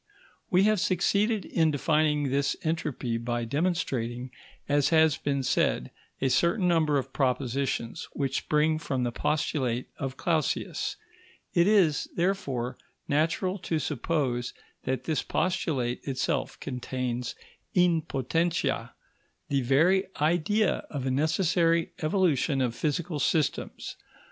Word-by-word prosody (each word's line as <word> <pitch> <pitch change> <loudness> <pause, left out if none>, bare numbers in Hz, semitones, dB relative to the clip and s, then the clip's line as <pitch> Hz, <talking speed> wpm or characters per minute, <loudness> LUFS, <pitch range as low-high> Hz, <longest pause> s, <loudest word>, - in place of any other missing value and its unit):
We 185 +1 +4
have 215 -1 +3
succeeded 200 +5 +1
in 160 -2 +2
defining 150 -1 +1
this 140 0 +1
entropy 150 -7 -2
by 120 0 -2
demonstrating, 130 -5 -1 0.4
as 145 -1 +3
has 160 -2 +5
been 140 -1 -1
said, - - +1 0.3
a 135 - +1
certain 170 - +2
number 160 -4 +3
of 135 -1 -3
propositions 130 -2 -1
which 135 -2 -1
spring 155 +1 +1
from 140 -5 -2
the 120 - 0
postulate 130 -3 -1
of 135 -1 -4
Clausius; 160 -3 -1 0.6
it 170 -1 +4
is, 185 -9 +3
therefore, 140 -10 -1 0.3
natural 165 +6 +1
to 165 -2 -1
suppose 135 -4 -1 0.3
that 130 -1 -1
this 155 +2 0
postulate 150 -10 -1
itself 135 +1 -1
contains 125 -1 -3 0.4
in 175 -3 +4
potentia 165 +4 -1 0.5
the 140 -1 +1
very 165 +10 +3
idea 175 +7 +2
of 140 -3 -4
a 130 - 0
necessary 165 +3 +2
evolution 155 -5 +2
of 125 -3 +1
physical 155 +4 -2
systems. 150 +1 -1
150 Hz, 120 wpm, -28 LUFS, 130-170 Hz, 0.6 s, has